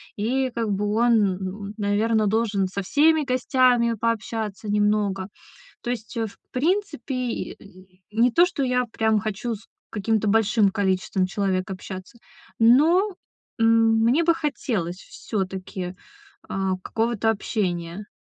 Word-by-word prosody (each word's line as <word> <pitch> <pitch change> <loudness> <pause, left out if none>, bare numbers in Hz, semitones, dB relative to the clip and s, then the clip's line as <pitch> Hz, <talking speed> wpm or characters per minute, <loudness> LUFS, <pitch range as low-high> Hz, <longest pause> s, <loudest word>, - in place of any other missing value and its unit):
и 255 +5 0
как 230 -2 -2
бы 200 +1 -1
он, 235 +1 +4 0.2
м, 200 +2 -6
наверно, 215 +1 +1
должен 210 -3 +1
со 200 +1 -4
всеми 310 +7 +3
гостями 255 -3 +2
пообщаться 220 -2 -2
немного. 205 -2 +1 0.5
То 240 - -3
есть, 235 0 -5
э, 225 -1 0
в 200 - -13
принципе 315 - -1
и, 250 -2 -3
э, - - -17 0.5
не 235 +3 +3
то 345 +6 +5
что 290 -5 -3
я 250 -1 +1
прям 220 -1 +2
хочу 215 +3 -3
с 200 - -17 0.2
каким-то 215 +1 0
большим 215 -1 +3
количеством 190 -2 0
человек 190 -1 -1
общаться, 190 +3 -8 0.4
но, 325 - +5 0.4
м, 225 0 +4
мне 275 +9 +3
бы 335 0 +4
хотелось 225 - -2
всё-таки, 190 -3 -5 0.5
а, 190 -1 -1
какого-то 225 0 0
общения. 190 -3 -3
220 Hz, 130 wpm, -24 LUFS, 195-245 Hz, 0.5 s, то